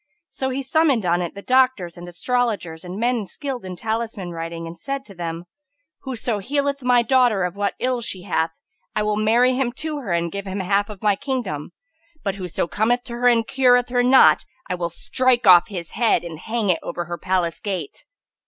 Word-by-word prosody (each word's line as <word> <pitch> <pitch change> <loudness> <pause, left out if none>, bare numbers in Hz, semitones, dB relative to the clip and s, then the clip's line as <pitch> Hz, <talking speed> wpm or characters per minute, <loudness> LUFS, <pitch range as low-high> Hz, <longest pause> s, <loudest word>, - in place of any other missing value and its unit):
So 265 - -2
he 265 +1 -3
summoned 270 - +2
on 175 0 +2
it 175 +1 -4
the 200 - -8
doctors 255 -9 +2
and 175 0 -9
astrologers 200 -4 -1
and 180 +2 -6
men 235 -3 0
skilled 270 -3 -5
in 185 -1 -6
talisman 220 -3 -3
writing 165 0 -5
and 165 0 -9
said 275 +4 -4
to 200 - -13
them, 170 -1 -5 0.5
"Whoso 245 -4 -2
healeth 280 +5 -1
my 245 -1 +4
daughter 240 -5 +3
of 180 +1 -2
what 200 0 -1
ill 250 -1 0
she 190 -5 -5
hath, 165 -4 0 0.5
I 215 - +1
will 210 0 +1
marry 230 +4 +3
him 255 -1 0
to 305 +2 -4
her 225 -10 -5
and 170 0 0
give 200 0 -5
him 190 +1 -3
half 200 +2 +1
of 210 -2 -10
my 205 -2 +4
kingdom; 240 - -3 0.5
but 195 - 0
whoso 180 -4 -3
cometh 235 +7 +1
to 240 - -8
her 245 +1 +1
and 230 -2 +4
cureth 250 -1 +3
her 245 0 +2
not, 255 +2 +6 0.2
I - - -2
will 175 -1 -2
strike 255 +8 +1
off 175 -2 +8
his 180 -6 -6
head 225 -3 +2
and 165 -3 -7
hang 220 -2 0
it 165 - 0
over 175 0 -4
her 175 +1 -5
palace 180 -3 0
gate." 185 -8 -5
210 Hz, 205 wpm, -22 LUFS, 180-250 Hz, 0.5 s, off